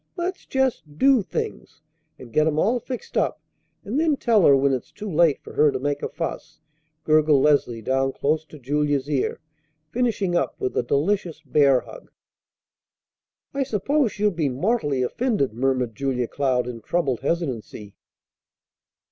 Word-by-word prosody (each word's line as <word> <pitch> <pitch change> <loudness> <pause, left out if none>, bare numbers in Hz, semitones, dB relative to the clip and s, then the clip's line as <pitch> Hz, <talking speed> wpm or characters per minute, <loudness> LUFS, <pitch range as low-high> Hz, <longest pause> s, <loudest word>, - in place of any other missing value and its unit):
Let's 365 +1 -4
just 255 - -1
do 270 +1 +5
things, 65 - -5 0.4
and 120 -3 -13
get 155 0 +3
'em 155 -1 0
all 230 +9 +2
fixed 250 +1 -7
up, - - 0 0.5
and 235 +8 -1
then 315 -3 +2
tell 225 -8 +4
her 140 - +7
when 135 0 +2
it's 130 - -4
too 210 0 -8
late 165 -2 +3
for - - -11
her 150 -1 +4
to - - -2
make 145 +2 -2
a - - -3
fuss," 165 +3 -6 0.4
gurgled 155 -3 +4
Leslie 125 -6 +2
down 135 +2 +1
close 155 +3 0
to 155 - -13
Julia's 145 +1 0
ear, 145 -3 -1 0.5
finishing 220 -6 0
up 175 - -1
with 130 - -2
a - - +2
delicious 160 +5 -1
bear 140 -2 +4
hug. - - -13 1.4
"I 280 - -1
suppose 265 +1 +1
she'll 210 0 +1
be 160 -5 -1
mortally 145 - 0
offended," 205 - 0
murmured 125 -1 0
Julia 125 -1 -1
Cloud 130 -2 0
in 120 -2 -6
troubled 135 -2 -1
hesitancy. 130 - -3
150 Hz, 155 wpm, -23 LUFS, 135-210 Hz, 1.4 s, her